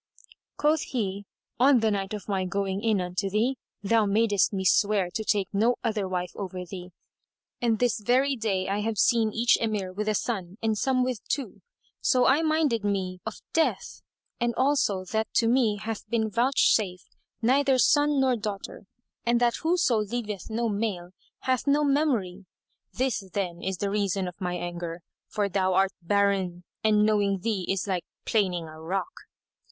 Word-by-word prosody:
Quoth 300 +1 +2
he, 200 -5 -3 0.3
"On 260 0 +6
the 220 -1 +2
night 195 -2 -2
of 205 - -9
my 195 -2 0
going 195 +2 -2
in 220 -3 +2
unto 180 +2 -2
thee, 235 +6 0 0.2
thou 215 +1 +3
madest 205 -1 +2
me 190 -2 -3
swear 200 -2 +3
to 220 - -2
take 205 -3 +1
no 225 +5 +3
other 215 -4 -1
wife 180 -1 -3
over 185 -2 -6
thee, 180 0 -8 0.7
and 230 -2 +2
this 245 0 +1
very 260 +6 +2
day 200 -5 -1
I 200 +1 -1
have 215 +1 -2
seen 225 +2 +3
each 235 +3 +3
Emir 210 -5 -2
with 210 +2 -2
a 215 - +1
son 195 -5 -3
and 220 -1 +1
some 255 +3 +1
with 250 -5 -2
two. 275 -2 -3 0.4
So 255 -2 +3
I 280 +4 +4
minded 310 -8 +1
me 190 -3 -1
of - - -7
death[FN#185]; 325 -1 0 0.4
and 240 -1 0
also 260 -9 +1
that 220 +3 -2
to 230 - +3
me 230 -3 +3
hath 215 +1 -6
been 220 -2 0
vouchsafed 220 -6 +1 0.3
neither 265 +2 +3
son 290 +4 +4
nor 260 -2 +3
daughter 205 -3 -6 0.4
and 235 0 +2
that 240 -1 +2
whoso 325 -9 +2
leaveth 210 -2 -4
no 230 +2 -1
male 200 -5 -2 0.3
hath 260 +1 0
no 290 +1 +3
memory. 240 -11 0 0.4
This, 255 -5 -1
then, 180 -4 -3
is 190 0 -2
the 200 +1 -2
reason 200 -2 0
of 180 +3 -9
my 180 -1 -2
anger, 175 -1 -5 0.2
for 205 -2 -1
thou 190 -1 +1
art 195 0 +3
barren; 190 -1 +1 0.2
and 210 -1 +4
knowing 200 -3 +1
thee 205 -4 -2
is 195 -2 0
like 185 -3 -1 0.2
planing 185 -6 +1
a 155 0 -11
rock." 195 - -3
210 Hz, 170 wpm, -27 LUFS, 190-240 Hz, 0.7 s, On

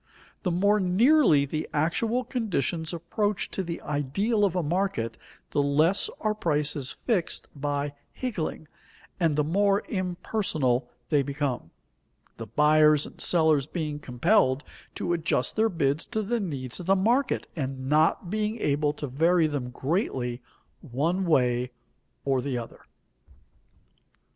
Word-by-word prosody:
The 185 - -1
more 200 +4 +3
nearly 195 - +4
the 155 +3 -4
actual 220 +11 +1
conditions 175 - -2
approach 190 +4 -2
to - - -2
the 170 -2 -4
ideal 195 - 0
of 185 -3 -1
a 180 - +1
market, 155 - -1 0.4
the 145 - +2
less 155 +7 +2
are 215 -1 +1
prices 150 -7 -1
fixed 200 -9 -2
by 145 0 -2 0.2
higgling, 190 -10 -4 0.5
and 165 -4 +2
the 150 - +2
more 200 +5 +2
impersonal 175 - -1 0.2
they 150 -3 +3
become, 140 - -3 0.7
the - - -7
buyers 150 0 +4
and - - -7
sellers 160 -5 +3
being 155 -3 -3
compelled 130 - +2 0.3
to 175 - -1
adjust 160 -6 0
their 220 +1 +3
bids 150 -3 0
to 220 - -2
the 235 +4 -1
needs 135 - -4
of 180 - -7
the 195 - +5
market, 240 +7 +1
and 135 -3 -4
not 155 +4 +2
being 215 +1 -1
able 145 -2 +1
to 150 - -5
vary 165 +6 +3
them 145 -5 -2
greatly 130 - -2 0.4
one 165 +8 -1
way 125 -5 +2 0.6
or 135 -2 +2
the 130 -1 -2
other. 115 -1 -7
155 Hz, 135 wpm, -27 LUFS, 140-195 Hz, 0.7 s, the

